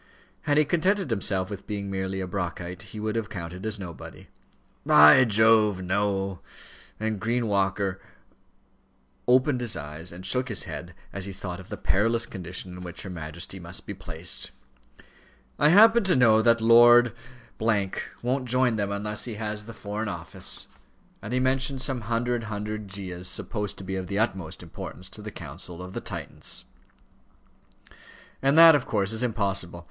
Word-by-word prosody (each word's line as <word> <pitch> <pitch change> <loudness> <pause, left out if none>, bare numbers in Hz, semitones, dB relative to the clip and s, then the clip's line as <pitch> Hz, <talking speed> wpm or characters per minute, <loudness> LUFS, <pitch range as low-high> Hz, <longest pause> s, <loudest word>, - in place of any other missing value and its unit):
Had 145 - +4
he 150 - +5
contented 185 - +1
himself 95 -3 0
with 100 - -7
being 100 -2 -4
merely 95 0 -3
a - - -2
Brockite, 90 0 -4
he 110 0 -9
would 110 +1 -2
have 115 -2 -2
counted 90 +2 -6
as 110 -1 -2
nobody. 90 -4 -10 0.5
"By 75 +11 +8
Jove! 110 -3 +4
no," 95 0 -1 0.6
and 110 -1 -2
Green 115 +4 0
Walker 95 -1 0 1.3
opened 130 +1 +3
his 120 -3 -1
eyes 75 +4 -7
and 90 +2 -9
shook 130 0 +2
his 110 - +1
head, - - -8 0.2
as 100 -1 -2
he 100 - -5
thought 90 -1 -6
of 95 - -12
the - - -5
perilous 115 +4 +2
condition 90 0 -6
in 90 - -9
which 90 -1 -7
her 95 - -7
Majesty 85 +3 -6
must 85 +1 -4
be 100 - -5
placed. 90 -3 -4 1.1
"I 150 - +5
happen 225 +6 +7
to 185 - +3
know 115 -4 +5
that 115 0 +3
Lord 120 0 +7 0.5
won't 115 +4 -1
join 125 -2 +2
them 100 -1 -1
unless 105 +1 -1
he 120 -3 -5
has 105 0 -3
the - - -7
Foreign 105 0 -4
Office," - - -3 0.6
and 105 - -7
he 125 - +1
mentioned 130 +1 0
some 130 -3 -1
hundred 115 +1 -1
handed 105 0 -5
Gyas 95 -2 -6
supposed 105 0 -3
to - - -7
be 95 0 -4
of 95 -1 -4
the 100 - -3
utmost 95 -7 -2
importance 95 +1 -9
to 105 - -8
the 105 - -6
counsels 85 0 -8
of 90 +1 -8
the - - -4
Titans. - - -5 1.8
"And 140 +3 +3
that, 165 0 +10
of 145 -4 +1
course, 100 -2 0
is 110 +1 -2
impossible. 100 -7 0
105 Hz, 165 wpm, -26 LUFS, 95-115 Hz, 1.8 s, that